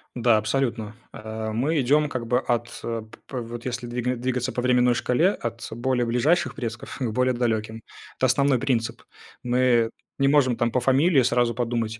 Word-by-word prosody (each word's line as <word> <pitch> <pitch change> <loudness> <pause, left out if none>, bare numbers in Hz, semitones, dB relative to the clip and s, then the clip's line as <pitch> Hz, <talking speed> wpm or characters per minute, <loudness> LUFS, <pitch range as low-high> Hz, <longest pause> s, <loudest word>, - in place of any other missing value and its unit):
Да, 120 -2 +3
абсолютно. 110 -1 -1 0.2
А, 110 0 -5
мы 145 +8 +1
идем 150 +4 +3
как 125 -4 -5
бы 125 +2 +2
от 120 -2 -1
п 115 -1 -3 0.3
п 130 - -6
вот 115 0 -8
если 120 -1 -4
двиг 125 +1 -2
двигаться 125 0 -1
по 125 - -2
временной 125 0 +3
шкале: 125 +9 +2
от 115 - -5
более 125 0 0
ближайших 130 +9 +1
предков, 120 -4 -6
ну, 125 - -1
к 110 - -5
более 125 0 +2
далеким. 110 -2 -2 0.4
Это 130 - +2
основной 135 0 +2
принцип. 120 -3 -1 0.4
Мы 125 -2 +2 0.3
не 135 - +3
можем, 135 -4 +3
там, 120 0 0
по 125 - +1
фамилии 135 +3 +3
сразу 120 -2 +1
подумать: 115 -2 -2
120 Hz, 180 wpm, -24 LUFS, 115-130 Hz, 0.4 s, Да